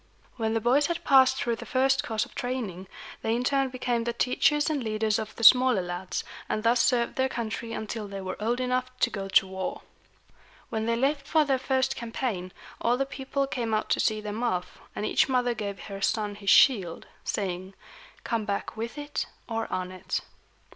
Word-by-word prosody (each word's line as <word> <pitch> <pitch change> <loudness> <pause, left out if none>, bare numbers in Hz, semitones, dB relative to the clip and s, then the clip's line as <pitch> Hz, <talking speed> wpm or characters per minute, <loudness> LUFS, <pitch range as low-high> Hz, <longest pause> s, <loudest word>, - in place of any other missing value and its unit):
When 225 -2 -1
the - - +3
boys 265 +6 +3
had 340 - -3
passed 265 -2 +6
through 235 -3 -1
the - - -8
first 265 +1 +2
course 220 -2 -1
of - - -18
training, 220 -8 -4 0.3
they 225 +1 0
in 245 - -1
turn 270 +1 +2
became 245 -2 -1
the 235 0 -2
teachers 295 +5 +2
and 300 -5 0
leaders 215 0 0
of 220 0 -6
the 230 - -6
smaller 250 -3 +7
lads, 175 +1 -4 0.3
and 215 - -1
thus 235 +1 +4
served 240 -2 +1
their 260 0 +2
country 230 -1 -4
until 220 -1 -4
they 195 0 -6
were 185 -1 -4
old 235 +3 0
enough 255 0 0
to 250 - +2
go 195 -2 -4
to 190 - +5
war. 190 0 -4 0.9
When 220 0 -2
they 230 - +2
left 275 +3 0
for 310 -1 +3
their 270 -2 +1
first 265 0 +1
campaign, 230 -6 -3 0.3
all 240 +1 +2
the 275 - +1
people 275 0 -2
came 235 -5 -1
out 215 - -1
to - - +3
see 215 0 +2
them 210 +1 -5
off, 185 -7 -2 0.2
and 210 - -2
each - - +2
mother 250 -2 +2
gave 200 -4 -5
her 195 -1 -7
son 210 0 0
his 200 -1 -3
shield, 195 -11 +5 0.2
saying, 190 -1 -3 0.5
"Come 230 -2 -1
back 200 +1 -3
with 230 +5 -5
it 290 0 -3 0.2
or 225 -1 -3
on 185 0 -2
it." 185 0 -3
230 Hz, 200 wpm, -27 LUFS, 210-255 Hz, 0.9 s, smaller